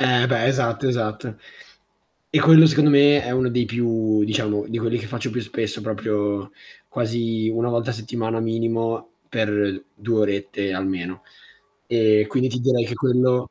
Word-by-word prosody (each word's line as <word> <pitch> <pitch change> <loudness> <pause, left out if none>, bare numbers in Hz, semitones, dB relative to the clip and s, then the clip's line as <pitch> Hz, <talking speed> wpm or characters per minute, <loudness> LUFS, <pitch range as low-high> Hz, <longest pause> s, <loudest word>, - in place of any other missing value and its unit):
Eh 125 -1 +3
beh, 120 -3 +1
esatto, 135 -1 0
esatto. 110 -1 -3 0.9
E 155 - +2
quello 160 +2 +8
secondo 150 -1 +4
me 145 0 +5
è 120 - -5
uno 130 0 0
dei 120 0 0
più 110 -2 0
diciamo 105 -1 -1
di 115 +1 -3
quelli 115 +1 -1
che 115 - -7
faccio 120 +2 -5
più 125 +2 -3
spesso, 110 0 -4
proprio 105 -2 -2 0.4
quasi 115 -1 -2
1 115 +2 -1
volta 120 +2 -1
a - - -2
settimana 115 0 -4
minimo, 115 0 -2 0.2
per 105 -3 -1
2 110 +2 -1
orette 100 -1 -2
almeno. 95 -1 -4 0.6
E 110 -2 +3
quindi 130 +3 0
ti 125 - -4
direi 125 -2 +2
che 120 - -5
quello 125 0 +1
115 Hz, 160 wpm, -22 LUFS, 105-125 Hz, 0.9 s, quello